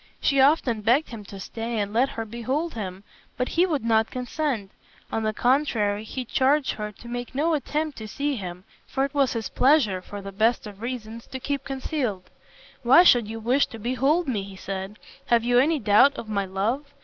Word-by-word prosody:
She 275 Hz, -2 st, +3 dB
often 265 Hz, -6 st, +3 dB
begged 245 Hz, +8 st, +2 dB
him 225 Hz, -3 st, -8 dB
to 195 Hz, 0 st, -10 dB
stay 225 Hz, +4 st, -4 dB
and 205 Hz, 0 st, -2 dB
let 250 Hz, +4 st, +3 dB
her 225 Hz, -, -5 dB
behold 260 Hz, +9 st, -3 dB
him, 195 Hz, -3 st, -6 dB, 0.3 s
but 250 Hz, -, -1 dB
he 350 Hz, +3 st, +3 dB
would 295 Hz, -9 st, -1 dB
not 220 Hz, -1 st, +3 dB
consent. 250 Hz, -5 st, -3 dB, 0.4 s
On 225 Hz, -, -1 dB
the 215 Hz, 0 st, 0 dB
contrary 220 Hz, -5 st, +1 dB
he 255 Hz, +3 st, -5 dB
charged 270 Hz, +4 st, +2 dB
her 210 Hz, -1 st, -5 dB
to 235 Hz, -, -14 dB
make 245 Hz, +1 st, -5 dB
no 320 Hz, +4 st, +2 dB
attempt 300 Hz, -1 st, -2 dB
to 220 Hz, -, -7 dB
see 285 Hz, +5 st, -2 dB
him, 180 Hz, -4 st, -7 dB, 0.2 s
for 270 Hz, 0 st, 0 dB
it 280 Hz, -, -7 dB
was 280 Hz, -3 st, +2 dB
his 225 Hz, -2 st, -3 dB
pleasure, 250 Hz, -9 st, +3 dB
for 205 Hz, +2 st, -8 dB
the 200 Hz, 0 st, -7 dB
best 220 Hz, +5 st, +1 dB
of 205 Hz, -1 st, -10 dB
reasons, 230 Hz, -2 st, -6 dB
to 260 Hz, -, -6 dB
keep 280 Hz, +1 st, -3 dB
concealed. 265 Hz, -, -3 dB, 0.5 s
"Why 270 Hz, +7 st, +7 dB
should 245 Hz, -10 st, +5 dB
you 225 Hz, +1 st, -6 dB
wish 250 Hz, +5 st, +2 dB
to 225 Hz, -, -9 dB
behold 270 Hz, +9 st, +1 dB
me?" 225 Hz, -6 st, 0 dB
he 195 Hz, 0 st, -9 dB
said; 190 Hz, +2 st, -6 dB, 0.3 s
"have 235 Hz, -1 st, +3 dB
you 245 Hz, +1 st, +4 dB
any 310 Hz, +5 st, +3 dB
doubt 230 Hz, +4 st, +5 dB
of 225 Hz, -, -6 dB
my 200 Hz, -2 st, -1 dB
love? 225 Hz, +10 st, -2 dB
235 Hz, 205 wpm, -25 LUFS, 210-275 Hz, 0.5 s, Why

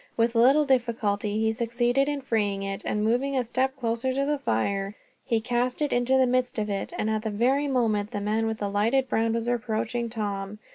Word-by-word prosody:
With 230 Hz, 0 st, +2 dB
little 265 Hz, +6 st, +5 dB
difficulty 220 Hz, -5 st, 0 dB
he 220 Hz, 0 st, +2 dB
succeeded 240 Hz, +4 st, +1 dB
in 290 Hz, -1 st, -2 dB
freeing 205 Hz, -6 st, -1 dB
it 195 Hz, 0 st, -4 dB
and, 210 Hz, 0 st, 0 dB
moving 255 Hz, +5 st, +1 dB
a 255 Hz, -, +2 dB
step 260 Hz, +3 st, -1 dB
closer 235 Hz, +1 st, -1 dB
to 275 Hz, +1 st, +1 dB
the 295 Hz, 0 st, 0 dB
fire, 195 Hz, -, -1 dB, 0.3 s
he 230 Hz, -, +1 dB
cast 245 Hz, +2 st, -1 dB
it 295 Hz, -1 st, 0 dB
into 245 Hz, +2 st, +2 dB
the 260 Hz, -, +5 dB
midst 250 Hz, 0 st, 0 dB
of 210 Hz, -1 st, -1 dB
it, 195 Hz, -, -3 dB
at 215 Hz, 0 st, 0 dB
the 220 Hz, -, -3 dB
very 255 Hz, +7 st, +1 dB
moment 220 Hz, -6 st, +1 dB
the 215 Hz, -3 st, -4 dB
man 215 Hz, +2 st, 0 dB
with 220 Hz, 0 st, -2 dB
the 205 Hz, -, -2 dB
lighted 230 Hz, +6 st, +2 dB
brand 225 Hz, -1 st, +1 dB
was 230 Hz, 0 st, -2 dB
approaching 235 Hz, 0 st, -1 dB
Tom. 205 Hz, -2 st, -4 dB
230 Hz, 205 wpm, -26 LUFS, 210-255 Hz, 0.3 s, little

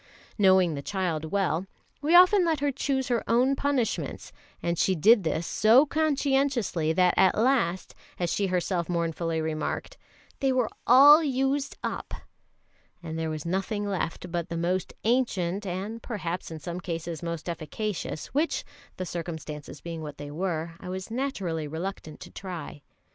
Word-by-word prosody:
Knowing 190 Hz, -4 st, +4 dB
the 140 Hz, -, -4 dB
child 170 Hz, -2 st, -2 dB
well, 190 Hz, 0 st, 0 dB, 0.3 s
we 310 Hz, +4 st, +3 dB
often 365 Hz, +2 st, +7 dB
let 325 Hz, -3 st, +1 dB
her 285 Hz, 0 st, +1 dB
choose 265 Hz, -1 st, -1 dB
her 240 Hz, -2 st, +1 dB
own 250 Hz, +4 st, +3 dB
punishments; 275 Hz, -4 st, -1 dB, 0.3 s
and 170 Hz, -1 st, -2 dB
she 190 Hz, -, +3 dB
did 210 Hz, +6 st, +5 dB
this 160 Hz, +1 st, -1 dB
so 230 Hz, -, +5 dB
conscientiously 275 Hz, -, +1 dB
that 180 Hz, +2 st, +3 dB
at 190 Hz, -, +4 dB
last, 220 Hz, -7 st, +1 dB, 0.2 s
as 175 Hz, -2 st, -1 dB
she 200 Hz, -, 0 dB
herself 180 Hz, -1 st, -1 dB
mournfully 165 Hz, -1 st, -1 dB
remarked, 155 Hz, -1 st, -3 dB, 0.4 s
"they 270 Hz, -2 st, +2 dB
were 255 Hz, -3 st, +1 dB, 0.2 s
all 290 Hz, +6 st, +9 dB
used 270 Hz, 0 st, 0 dB
up," -, -, -4 dB, 0.9 s
and 160 Hz, -1 st, -5 dB
there 160 Hz, -1 st, -1 dB
was 155 Hz, 0 st, -5 dB
nothing 195 Hz, +4 st, -1 dB
left 180 Hz, -2 st, -3 dB
but 170 Hz, -1 st, -2 dB
the 170 Hz, -, -3 dB
most 175 Hz, +2 st, -1 dB
ancient 205 Hz, -5 st, 0 dB
and 200 Hz, +6 st, -4 dB
perhaps 180 Hz, -7 st, -4 dB
in 160 Hz, -, -6 dB
some 175 Hz, +2 st, -5 dB
cases 165 Hz, -2 st, -5 dB
most 170 Hz, -1 st, -5 dB
efficacious, 170 Hz, 0 st, -4 dB
which, 305 Hz, +4 st, 0 dB, 0.3 s
the 185 Hz, -, -3 dB
circumstances 160 Hz, -4 st, -6 dB
being 165 Hz, -1 st, -6 dB
what 150 Hz, -2 st, -7 dB
they 145 Hz, 0 st, -7 dB
were, 165 Hz, 0 st, -2 dB
I 180 Hz, -, -8 dB
was 185 Hz, +3 st, -5 dB
naturally 195 Hz, -, -2 dB
reluctant 160 Hz, 0 st, -6 dB
to -, -, -10 dB
try. 180 Hz, -6 st, -7 dB
185 Hz, 155 wpm, -27 LUFS, 165-245 Hz, 0.9 s, all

